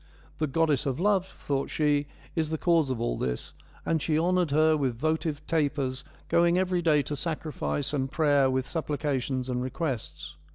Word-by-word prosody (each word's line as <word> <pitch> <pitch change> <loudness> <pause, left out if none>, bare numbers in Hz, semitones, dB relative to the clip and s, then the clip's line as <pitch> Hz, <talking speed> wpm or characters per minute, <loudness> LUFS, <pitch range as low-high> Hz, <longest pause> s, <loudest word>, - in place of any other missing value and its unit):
' - - -27
The 155 - +1
goddess 150 -1 +1
of 135 +1 -1
love,' 195 -1 +2
thought 140 -6 -3
she, 145 -2 +1
' - - -24
is 160 -2 0
the 160 - -1
cause 165 -4 +2
of 130 -3 -2
all 120 - -1
this,' 60 -1 -3 0.3
and 160 -2 +1
she 155 +1 +1
honoured 180 +1 +2
her 155 +2 +4
with 130 -6 -1
votive 155 +1 -1
tapers, 140 -4 0 0.2
going 170 +1 +3
every 185 -1 +1
day 155 -4 +3
to 145 - -4
sacrifice 150 -2 -3
and 135 -2 -1
prayer 145 -4 +3
with 130 0 0
supplications 140 -5 -2
and 125 -1 -1
requests. 130 -1 -4
150 Hz, 180 wpm, -28 LUFS, 135-165 Hz, 0.3 s, her